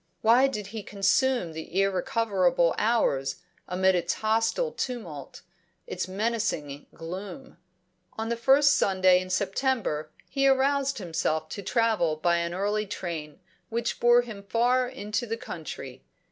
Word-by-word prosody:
Why 240 +5 +5
did 210 -6 -4
he 220 - -4
consume 200 0 +1
the 160 +3 -4
irrecoverable 190 -2 +2
hours 140 - +1 0.3
amid 190 +1 +2
its 175 -1 0
hostile 225 - 0
tumult, 175 - -6 0.4
its 180 - -4
menacing 195 -8 -2
gloom? 190 - -8 0.5
On 220 +1 -4
the 235 - 0
first 280 +4 +5
Sunday 185 -2 +4
in 185 - -8
September 190 - -1 0.2
he 275 -1 +1
aroused 275 0 +2
himself 160 -4 -2
to 200 - -6
travel 220 -8 +1
by 170 +2 +1
an 170 0 -2
early 205 +2 -1
train, 170 -5 -6 0.3
which 235 +1 -2
bore 240 0 +5
him 215 -4 -8
far 245 +5 +1
into 235 -2 -3
the 225 +1 -3
country. 155 - -8
205 Hz, 130 wpm, -27 LUFS, 175-240 Hz, 0.5 s, Why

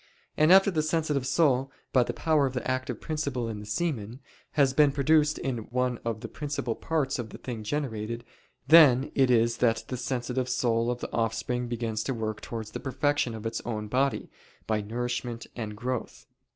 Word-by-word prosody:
And 155 +3 +4
after 195 +1 +7
the 160 -4 +1
sensitive 155 -4 0
soul, 135 -4 +2 0.2
by 130 - +6
the 120 - 0
power 155 -4 +2
of 130 - -6
the 125 - -3
active 130 0 -2
principle 140 -6 -2
in 110 -2 -5
the 105 - -9
semen, 120 -4 -2 0.3
has 140 -3 +3
been 145 0 +5
produced 150 +2 +3
in 130 -3 -2
one 125 0 0
of 115 -2 -3
the 115 - -5
principal 140 -4 -3
parts 145 -5 -1
of 115 -2 -4
the - - -9
thing 120 -4 -6
generated, 115 -2 -3 0.4
then 145 -5 +7
it 135 -2 +3
is 115 -1 +3
that 115 -2 +2
the 125 - -3
sensitive 125 0 -2
soul 120 -2 +1
of 125 0 -2
the - - -5
offspring 115 +2 -1
begins 115 -2 -2
to 135 - -1
work 110 -2 -3
towards 110 -2 -6
the - - -5
perfection 140 -2 0
of 110 0 -8
its 115 - -2
own 105 -2 -4
body, 135 +4 0 0.3
by 110 -1 0
nourishment 120 +2 -3
and 105 -3 -5
growth. 125 +1 -4
125 Hz, 190 wpm, -28 LUFS, 115-140 Hz, 0.4 s, after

